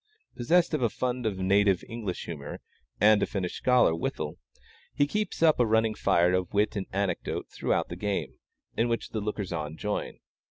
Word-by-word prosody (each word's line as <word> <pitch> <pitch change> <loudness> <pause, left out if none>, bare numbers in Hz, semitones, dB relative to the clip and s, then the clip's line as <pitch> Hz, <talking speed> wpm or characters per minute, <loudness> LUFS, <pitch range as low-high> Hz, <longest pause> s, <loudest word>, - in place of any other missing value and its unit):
Possessed 170 +8 +2
of 155 - 0
a 120 - +3
fund 125 +1 -2
of 100 -3 -2
native 95 0 +3
English 115 -6 -5
humor, 75 -5 -7 0.4
and 105 0 +5
a - - +1
finished 90 -3 -3
scholar 125 -9 +4
withal, 80 - -4 0.6
he 145 - +3
keeps 210 +2 -2
up 155 -4 +5
a 120 - +5
running 110 0 +2
fire 85 -3 +2
of 90 -1 0
wit 105 +2 +2
and 100 -2 -3
anecdote 100 -2 -2
throughout - - -1
the 85 - -5
game, 100 +2 -3 0.4
in 120 +1 +1
which 115 - -2
the 110 - -3
lookers 105 -3 -3
on 80 -1 -4
join. 105 0 -3
105 Hz, 185 wpm, -28 LUFS, 95-120 Hz, 0.6 s, and